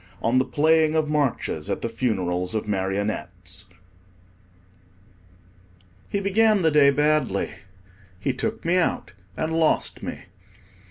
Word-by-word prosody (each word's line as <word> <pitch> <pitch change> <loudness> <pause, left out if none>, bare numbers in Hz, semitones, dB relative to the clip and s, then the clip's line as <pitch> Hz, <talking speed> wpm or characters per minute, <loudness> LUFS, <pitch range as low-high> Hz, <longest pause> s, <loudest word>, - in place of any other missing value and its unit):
ON 120 +3 +2
THE 130 - +1
PLAYING 155 +1 +3
OF 155 -1 +1
MARCHES 145 -4 -1
AT - - -2
THE - - 0
FUNERALS 95 -5 -1
OF 110 - -2
MARIONETTES 95 -1 -2 2.4
HE 200 - -1
began 210 0 +3
the 160 - +4
day 145 -2 +6
badly. 150 +2 +1 0.7
He 130 +7 -1
took 130 - -4
me 175 +2 +2
out 180 - 0 0.3
and 160 +1 -2
lost 160 -1 +1
me. - - -6
140 Hz, 120 wpm, -24 LUFS, 100-160 Hz, 2.4 s, day